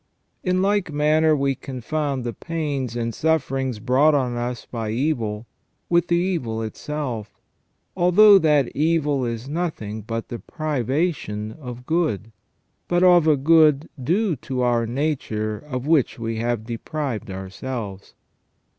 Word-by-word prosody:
In 185 0 +1
like 200 -4 +1
manner 155 +1 +3
we 140 -1 +1
confound 135 +1 -3
the 120 -1 -3
pains 140 - -3
and 115 -1 -2
sufferings 135 -5 0
brought 130 +7 +3
on 125 -4 0
us 120 0 -4
by 115 -3 -4
evil 115 -4 -1 0.4
with 170 0 +3
the 170 - +2
evil 160 -12 -1
itself, 115 -4 -5 0.6
although 195 +3 +7
that 150 -6 +2
evil 150 -3 +1
is 115 +2 -4
nothing 145 -10 -3
but 115 +2 -5
the 120 - -5
privation 140 -7 -2
of 125 -2 -9
good, 155 - 0 0.6
but 175 +1 +2
of 175 -3 +6
a 150 -2 +5
good 155 0 +4
due 185 - +1
to 125 0 -3
our 120 -2 +2
nature 115 -6 -2
of 130 -3 -5
which 155 -4 +2
we 115 -1 -3
have 115 -1 -1
deprived 120 -1 -4
our 95 0 -6
selves. 105 -4 -6
135 Hz, 135 wpm, -23 LUFS, 115-155 Hz, 0.6 s, although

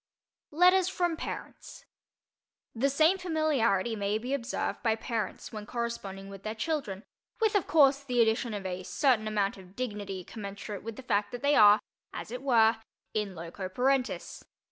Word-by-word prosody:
LETTERS 360 +3 +5
FROM 350 -3 0
PARENTS - - -8 0.9
THE 260 +4 +1
same 315 +7 +3
familiarity 280 - +1
may 205 0 0
be 245 +5 -4
observed 260 -3 -2
by 225 -2 +2
parents 225 0 -4
when 210 -1 -7
corresponding 205 -5 -4
with 195 -1 -10
their 215 +2 -4
children, 220 -6 -3 0.4
with, 440 -1 +2
of 405 -4 +1
course, 280 -2 +5
the 250 -3 -1
addition 225 0 +2
of 200 -2 -6
a 185 0 -3
certain 225 +2 +1
amount 205 -2 0
of 185 0 -15
dignity 205 -6 -4
commensurate 200 0 -7
with 225 0 -6
the 265 - -10
fact 205 -3 0
that 245 +1 -7
they 285 +1 +4
are, 210 0 +8 0.3
as - - -6
it 250 +1 -5
were, 230 -4 +4 0.4
in 210 -3 -2
loco 170 +3 -6
parentis. 255 +5 0
230 Hz, 165 wpm, -29 LUFS, 205-275 Hz, 0.9 s, are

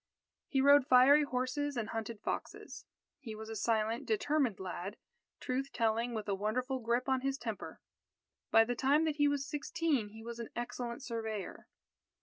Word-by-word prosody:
He 270 - +1
rode 285 0 +6
fiery 260 +4 +7
horses 280 +1 -1
and 220 -3 -2
hunted 225 -1 -4
foxes. - - -5 0.3
He 225 -6 -7
was 220 +1 -8
a 225 - -5
silent, 220 +1 0
determined 300 - +1
lad, 190 +2 -5 0.4
truth 265 +2 -2
telling, 230 +1 0
with 215 -1 -4
a 200 - 0
wonderful 250 +7 -1
grip 240 +2 0
on 265 -1 +1
his 275 0 -1
temper. 225 -6 -6 0.7
By 225 - +7
the 245 +2 -1
time 280 +6 +3
that 310 -2 -1
he 290 -1 +4
was 285 -1 0
sixteen 300 -5 -1
he 220 +2 -12
was 235 0 -7
an 230 - -5
excellent 240 +1 -4
surveyor. 220 -4 -5
245 Hz, 165 wpm, -33 LUFS, 225-275 Hz, 0.7 s, fiery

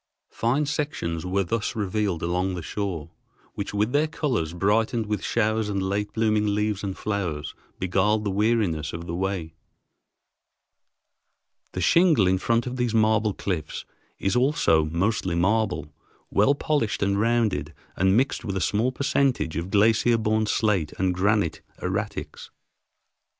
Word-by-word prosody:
Fine 130 +6 0
sections 140 - -3
were 100 +2 +1
thus 105 +4 -2
revealed 100 -4 -1
along 90 +2 0
the 85 - -5
shore, 90 -5 -4 0.4
which 100 - -4
with 105 +3 0
their 150 +3 +2
colors, 125 - -1
brightened 110 +6 +1
with 105 0 -2
showers 110 -1 0
and 100 -1 -1
late 100 +2 -1
blooming 105 -2 +1
leaves 105 -1 -1
and 95 -2 -4
flowers, 90 -8 -3 0.2
beguiled 95 +4 +1
the 100 - -1
weariness 100 -7 +1
of 85 +1 -6
the 85 - -5
way. 90 -3 -2 2.2
The 90 - -3
shingle 160 - +4
in 95 0 +2
front 115 +3 +1
of 125 0 -4
these 120 -2 0
marble 110 -1 +2
cliffs 80 -6 -4 0.3
is 95 - -1
also 125 - +3
mostly 90 +3 0
marble, 110 +6 0 0.4
well 120 +8 +4
polished 140 -9 0
and 100 0 +1
rounded 110 -9 +1 0.2
and 95 +3 +3
mixed 130 -1 +1
with 100 -4 -3
a - - 0
small 110 +7 +1
percentage 135 - 0
of 85 +3 -3
glacier 110 +3 +4
borne 110 0 +1
slate 100 -8 +1
and 95 -1 +1
granite 100 -2 +1 0.2
erratics. 100 +3 -4
105 Hz, 145 wpm, -25 LUFS, 90-115 Hz, 2.2 s, shingle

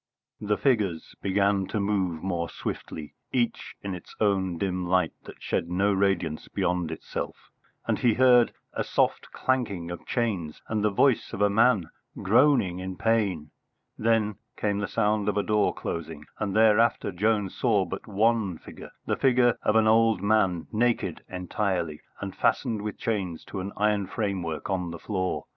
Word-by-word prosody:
The 105 0 0
figures 105 - 0
began 100 0 +1
to 110 - -2
move 95 -5 -1
more 85 -3 -2
swiftly, 75 -2 -6 0.2
each 120 -2 -1
in 100 -1 -3
its 90 - -10
own 95 -4 +1
dim 90 -1 -2
light 90 +1 +2
that - - -12
shed 85 - -1
no 100 +3 +2
radiance 95 -5 0
beyond 90 -2 -1
itself, - - -6 0.3
and - - 0
he 120 -3 +3
heard 125 -2 +5 0.2
a - - -1
soft - - 0
clanking 100 -10 -1
of 85 - -8
chains 95 -10 -2
and 110 -1 -1
the 105 - +4
voice 115 +4 +2
of 100 - -4
a 100 - +4
man 110 -5 +3 0.3
groaning 110 -4 +3
in 95 0 -5
pain. 100 -9 0 0.4
Then 110 -2 +1 0.2
came 100 -1 0
the 105 - -2
sound 105 -2 +1
of 105 - -1
a 105 - +2
door 105 -1 +2
closing, 80 -2 -5
and 100 -2 -2
thereafter 110 -1 +4
Jones 105 +1 0
saw 105 -6 +2
but 95 - -7
one 110 -3 +1
figure, - - -11 0.2
the - - 0
figure 125 -2 +3
of 105 - +1
an 110 -1 +5
old 115 -2 +4
man, 100 -5 +2
naked 120 +2 0
entirely, 90 -3 -2 0.2
and - - -5
fastened 110 -3 +1
with 105 0 -5
chains 95 -7 -3
to 100 - -6
an 95 +2 -4
iron 105 -2 +1
framework 95 -8 -3
on 90 -3 -1
the 85 - -6
floor. 95 0 -2
100 Hz, 165 wpm, -27 LUFS, 90-110 Hz, 0.4 s, heard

